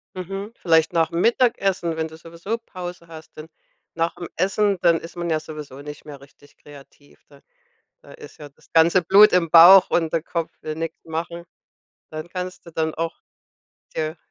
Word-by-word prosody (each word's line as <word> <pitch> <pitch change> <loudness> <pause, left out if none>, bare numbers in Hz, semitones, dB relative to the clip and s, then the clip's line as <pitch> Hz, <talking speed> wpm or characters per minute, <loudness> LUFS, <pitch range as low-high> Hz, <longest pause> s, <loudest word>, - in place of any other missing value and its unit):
Mhm. 195 +3 -6
Vielleicht 160 -1 +2
nachm 170 +1 0
Mittagessen, 195 -8 +1
wenn 160 0 -2
du 160 0 -13
sowieso 170 +7 -6
Pause 180 -6 -9
hast, 160 -1 -13
denn 155 - -9 0.5
nachm 165 +1 -3
Essen, 195 +2 +1
dann 170 -2 +3
ist 165 - -12
man 170 -1 -4
ja 155 -1 +1
sowieso 150 -3 -10
nicht 150 +1 -10
mehr 145 -2 -10
richtig 140 +1 -20
kreativ. 145 0 -18
Da - - -19 0.6
da - - -16
ist 465 -3 -14
ja 145 -1 -10
das 140 - -27
ganze 170 +2 +4
Blut 205 +5 +7
im 170 -3 +1
Bauch 180 +3 +8
und 165 -2 +1
der 165 -1 -1
Kopf 170 -1 -4
will 155 - -5
nix 165 +1 -5
machen. 170 +1 -5 0.7
Dann 155 +1 -7
kannst 180 +1 -7
du 170 - -12
dann 160 -1 -2
auch 165 0 -5 0.7
dir 155 +1 -3
165 Hz, 175 wpm, -22 LUFS, 160-180 Hz, 0.7 s, Bauch